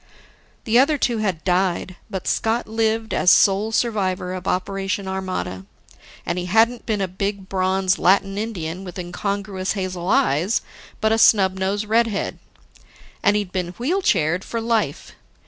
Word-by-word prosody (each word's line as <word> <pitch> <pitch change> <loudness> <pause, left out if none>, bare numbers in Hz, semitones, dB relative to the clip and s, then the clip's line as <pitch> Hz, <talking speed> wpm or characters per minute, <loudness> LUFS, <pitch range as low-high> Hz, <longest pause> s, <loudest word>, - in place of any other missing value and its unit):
The 235 0 +3
other 295 +3 +3
two 240 -4 0
had 190 -7 -2
died, 180 0 0
but 190 -4 -5
Scott 225 +2 0
lived 225 0 0
as - - +3
sole 200 +4 +4
survivor 190 -6 0
of 185 0 -6
Operation 195 +1 -2
Armada. 185 - -4 0.6
And 180 - -1
he 180 - -4
hadn't 225 +5 +2
been 215 -3 0
a 190 - 0
big, 195 +1 -4
bronze, 185 0 +1
Latin 195 +1 +3
Indian 190 -5 -4
with 180 -1 -8
incongruous 190 +1 -3
hazel 185 -3 -4
eyes, 215 - +2 0.4
but 220 -1 +2
a 225 - +2
snub 190 -4 +4
nosed 200 +3 -1
redhead. 220 -1 0 0.8
And 205 0 +3
he'd 205 -3 -1
been 180 -2 -3
wheel 330 +11 0
chaired 180 - +1
for 230 - -4
life. 225 -10 -1
195 Hz, 150 wpm, -22 LUFS, 185-220 Hz, 0.8 s, sole